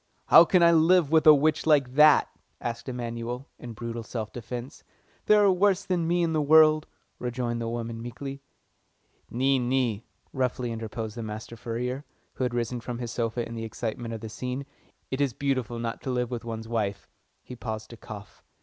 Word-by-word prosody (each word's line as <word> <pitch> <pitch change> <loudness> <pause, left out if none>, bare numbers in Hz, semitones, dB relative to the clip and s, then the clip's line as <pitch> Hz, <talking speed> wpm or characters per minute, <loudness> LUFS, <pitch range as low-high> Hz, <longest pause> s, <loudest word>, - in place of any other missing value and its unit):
"How 170 - +9
can 180 0 +4
I 170 - +7
live 165 -1 +4
with 160 -1 +4
an - - +12
old 140 - +2
witch 155 +1 +1
like 140 -5 +3
that?" 150 +1 +6 0.3
asked 120 +2 -5
Emanuel, 120 +1 -5
in 120 -1 -8
brutal 115 +1 -5
self 110 -1 -5
defence. 120 +3 -7 0.4
"There 210 -1 +6
are 200 - +6
worse 190 +1 +2
than 175 -3 0
me 175 +1 +2
in 165 -1 0
the 155 - +2
world," 155 +1 +5 0.3
rejoined 120 -1 -2
the 115 - -2
woman 115 -1 -4
meekly. 135 +4 -7 0.9
"Nee, 135 +2 +2
nee," 120 -3 0 0.3
roughly 125 -2 -1
interposed 110 -1 -5
the - - -4
master 110 +1 -6
furrier, 125 +3 -4 0.3
who - - -3
had 125 -1 -1
risen 120 +1 -2
from 120 +1 -5
his 120 -1 -5
sofa 115 0 -2
in 115 - -8
the 115 -1 -5
excitement 115 +1 -4
of 110 - -8
the 110 - -6
scene. 125 +5 -4 0.5
"It 130 +2 -1
is 140 -4 +1
not - - -36
beautiful 130 -4 -1
not 115 -1 -4
to - - -5
live 125 -1 -1
with 120 -2 -4
one's 115 -1 -6
wife." 105 -4 -2 0.4
He 125 - -9
paused 110 -2 -6
to 115 - -10
cough. 105 -2 -11
125 Hz, 195 wpm, -27 LUFS, 115-140 Hz, 0.9 s, an